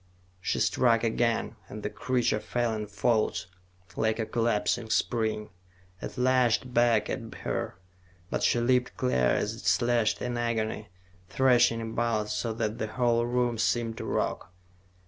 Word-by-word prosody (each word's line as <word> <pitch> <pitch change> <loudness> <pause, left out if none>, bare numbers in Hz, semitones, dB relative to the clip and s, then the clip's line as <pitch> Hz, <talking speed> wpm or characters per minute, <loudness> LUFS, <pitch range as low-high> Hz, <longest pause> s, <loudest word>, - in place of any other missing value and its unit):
She 90 - -1
struck 115 -2 +3
again, 115 0 0
and 105 0 -8
the 105 - -1
creature 125 -4 0
fell 120 0 -1
in 105 -1 -4
folds, 110 +2 0 0.5
like 110 0 +1
a 110 - -1
collapsing 115 0 0
spring. 110 -2 0 0.5
It - - -7
lashed 125 -1 +2
back 120 -2 +3
at - - -5
her, - - -3 0.6
but - - -1
she 120 - +3
leaped 125 +1 +1
clear 95 - +2
as - - +1
it - - -11
slashed 120 -2 +2
in 120 -1 -3
agony, 110 -3 -2 0.4
thrashing 120 -2 +3
about 110 -1 -1
so 115 +2 -1
that 110 -1 -2
the 110 - -1
whole 120 0 +1
room 120 -2 0
seemed 115 0 0
to - - -5
rock. 85 - -2
115 Hz, 145 wpm, -28 LUFS, 110-120 Hz, 0.6 s, struck